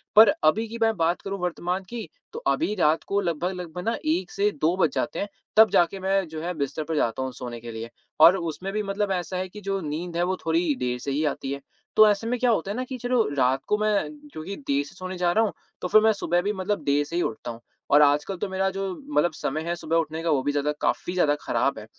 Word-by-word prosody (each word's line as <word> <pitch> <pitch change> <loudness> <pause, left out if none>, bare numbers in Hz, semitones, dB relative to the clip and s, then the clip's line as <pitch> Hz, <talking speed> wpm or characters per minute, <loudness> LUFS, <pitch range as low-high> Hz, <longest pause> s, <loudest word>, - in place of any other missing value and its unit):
पर 215 -1 +9
अभी 215 +9 +3
की 230 +2 -7
मैं 225 -1 +3
बात 165 +1 +1
करूँ 195 -1 -4
वर्तमान 180 +2 -2
की 235 -2 -5 0.3
तो 465 - -5
अभी 260 -10 +1
रात 160 -3 +2
को 200 0 +1
लगभग-लगभग 180 0 -3
ना 230 - +1
1 175 +4 0
से 205 +1 +2
2 165 +4 +3
बज 165 -5 +3
जाते - - -1
हैं, 205 - -1 0.3
तब 220 0 +8
जाके 175 +3 +3
मैं 190 -1 +1
जो 155 0 -6
है 180 +2 -2
बिस्तर 140 +2 -2
पे 160 +1 -3
जाता 115 -2 0
हूँ 130 - -3
सोने 120 -2 -7
के 115 0 -8
लिए। 115 +1 -6 0.3
और 170 +4 +9
उसमें 175 +3 -4
भी 215 0 -1
मतलब 200 0 -1
ऐसा 180 0 -2
है 185 0 -2
कि 210 +2 -10
जो 195 0 -2
नींद 165 +3 -4
है 175 - +2
वो 185 +1 0
थोड़ी 165 -2 +2
देर 125 -1 -1
से 140 +2 -4
ही 150 +3 0
आती 135 -1 -2
है। 140 0 -4 0.3
तो 215 0 +8
ऐसे 210 +2 0
में 245 0 -1
क्या 250 - +3
होता 195 -1 0
है - - -3
ना 255 - -1
कि 255 0 -6
चलो 245 -1 +2
रात 130 +1 +3
को 210 - +2
मैं 215 -1 +1 0.2
चूँकि 180 +6 -6
देर 140 +1 +2
से - - -14
सोने 185 0 -6
जा 175 -1 +2
रहा 220 +4 +3
हूँ 210 - -1 0.3
तो 180 - -1
फ़िर 215 +3 +6
मैं 220 0 +5
सुबह 175 -3 0
भी 205 +3 0
मतलब 190 -3 -2
देर 145 +1 +2
से 165 - -7
ही 175 - +2
उठता 120 -1 -3
हूँ। 115 - -10 0.3
और 145 +1 +7
आजकल 150 +6 +3
तो 205 - -2
मेरा 190 0 0
जो 195 0 -3 0.2
मतलब 175 - +3
समय 155 0 -3
है 170 - 0
सुबह 165 -1 -2
उठने 160 0 -1
का 170 - 0
वो 135 -3 +2
भी 145 - +1
ज़्यादा 145 +1 0
काफ़ी 180 - 0
ज़्यादा 150 -5 +3
ख़राब 140 -4 0
है। 105 - -10
175 Hz, 265 wpm, -25 LUFS, 150-200 Hz, 0.3 s, पर